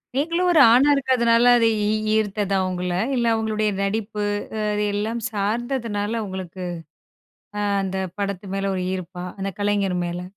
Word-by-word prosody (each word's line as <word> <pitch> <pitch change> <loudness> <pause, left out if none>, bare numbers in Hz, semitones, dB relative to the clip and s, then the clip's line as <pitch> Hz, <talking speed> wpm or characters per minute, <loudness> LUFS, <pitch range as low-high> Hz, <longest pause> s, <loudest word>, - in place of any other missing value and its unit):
நீங்களும் 335 +5 +1
ஒரு 320 - +5
ஆணா 275 +4 +5
இருக்கதனால, 240 -3 +3
அது 230 -1 +3 0.2
ஈ - - +1
ஈ - - +1 0.2
ஈர்த்ததா 205 -2 0
உங்கள? 180 0 -3 0.2
இல்ல 240 -1 +1
அவங்களுடைய 215 -1 0
நடிப்பு, 210 +1 -2 0.3
அ - - -2
அது 210 0 0
எல்லாம் 220 +3 -2
சார்ந்ததுனால 225 0 -2
உங்களுக்கு 185 -1 -6 1.0
அ - - 0 0.2
அந்த 190 0 -3 0.2
படத்து 200 -1 -3
மேல 195 0 -1
ஒரு 185 - -2
ஈர்ப்பா, 180 0 -6 0.2
அந்த 195 0 -2
கலைஞர் 200 -3 +1
மேல? 175 +1 -4
205 Hz, 150 wpm, -23 LUFS, 190-230 Hz, 1.0 s, ஒரு